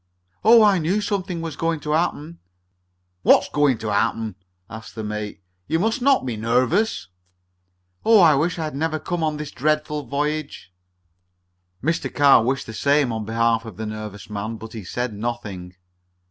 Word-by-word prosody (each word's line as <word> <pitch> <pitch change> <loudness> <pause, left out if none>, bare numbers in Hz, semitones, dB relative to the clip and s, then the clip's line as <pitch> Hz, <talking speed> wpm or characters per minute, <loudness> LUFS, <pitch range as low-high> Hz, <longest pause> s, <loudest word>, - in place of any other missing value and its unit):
"Oh! 225 +1 +7
I 200 -3 +4
knew 175 +6 0
something 195 -4 -2
was 165 -3 -5
going 165 0 -1
to 150 - -3
happen!" 165 0 -1 0.8
"What's - - +4
going 145 -4 +2
to 110 -1 -3
happen?" 110 +1 0 0.3
asked 110 0 -10
the 110 - -5
mate. 105 -2 -5 0.2
"You 160 - +1
must 220 +8 0
not 270 - +3
be 125 - -2
so 110 - -7
nervous." 125 - +1 0.9
"Oh! 225 -1 +6
I 165 -5 +7
wish 160 +6 0
I 165 - -2
had 155 - -4
never 155 +2 -1
come 170 +2 -3
on 155 -1 0
this 150 -1 -6
dreadful 150 0 -1
voyage!" 145 -6 -3 1.1
Mr. 165 +4 -1
Carr 140 -5 +5
wished 130 +3 -1
the 110 - -8
same 140 +1 +2
on 110 -1 -4
behalf 115 +1 +1
of 110 -6 -10
the 110 - -4
nervous 105 -2 -7
man, 105 +2 -4
but 110 +1 -10
he 110 -3 -7
said 120 +5 -3
nothing. 105 -5 -5
140 Hz, 175 wpm, -22 LUFS, 110-165 Hz, 1.1 s, Oh